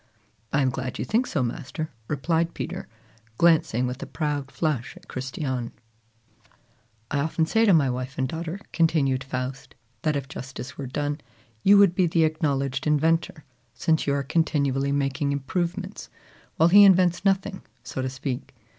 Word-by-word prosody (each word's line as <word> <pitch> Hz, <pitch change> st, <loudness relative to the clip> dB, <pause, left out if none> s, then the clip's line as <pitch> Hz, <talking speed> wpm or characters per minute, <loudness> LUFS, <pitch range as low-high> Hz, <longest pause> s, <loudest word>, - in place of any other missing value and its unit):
"I 145 Hz, -, +2 dB
am 130 Hz, -, +2 dB
glad 130 Hz, 0 st, -4 dB
you -, -, -3 dB
think 235 Hz, +4 st, +1 dB
so, 145 Hz, -7 st, 0 dB
master," 155 Hz, +4 st, -4 dB, 0.2 s
replied 165 Hz, +3 st, 0 dB
Peter, 180 Hz, +2 st, -5 dB, 0.5 s
glancing 160 Hz, -8 st, +3 dB
with 125 Hz, +1 st, -4 dB
a -, -, -5 dB
proud 145 Hz, -3 st, -2 dB
flush 145 Hz, -6 st, -2 dB
at -, -, -17 dB
Christiane. 130 Hz, -2 st, -4 dB, 1.4 s
"I 145 Hz, -, +1 dB
often 160 Hz, +2 st, +1 dB
say 225 Hz, +7 st, +3 dB
to 200 Hz, -, +5 dB
my 155 Hz, -5 st, +4 dB
wife 130 Hz, +2 st, -4 dB
and 130 Hz, -, +1 dB
daughter," 165 Hz, +5 st, -5 dB
continued 145 Hz, -6 st, +2 dB
Faust, 130 Hz, +1 st, -5 dB, 0.3 s
"that 155 Hz, -1 st, +1 dB
if 140 Hz, -2 st, -3 dB
justice 135 Hz, -1 st, -8 dB
were 140 Hz, -, -5 dB
done, 145 Hz, +3 st, -2 dB, 0.4 s
you 200 Hz, -, +6 dB
would 200 Hz, -3 st, +6 dB
be 180 Hz, -1 st, +2 dB
the 165 Hz, 0 st, +2 dB
acknowledged 140 Hz, -3 st, 0 dB
inventor, 160 Hz, +1 st, +1 dB, 0.3 s
since 160 Hz, +6 st, +1 dB
you 140 Hz, -, +2 dB
are 140 Hz, -, -1 dB
continually 140 Hz, -3 st, +1 dB
making 140 Hz, 0 st, 0 dB
improvements, 170 Hz, +6 st, -3 dB, 0.5 s
while 165 Hz, -, +5 dB
he 205 Hz, +3 st, +9 dB
invents 185 Hz, -2 st, +5 dB
nothing, 195 Hz, 0 st, +1 dB, 0.2 s
so 125 Hz, +2 st, -4 dB
to 130 Hz, -, -1 dB
speak. 130 Hz, -1 st, -5 dB
145 Hz, 160 wpm, -25 LUFS, 135-165 Hz, 1.4 s, he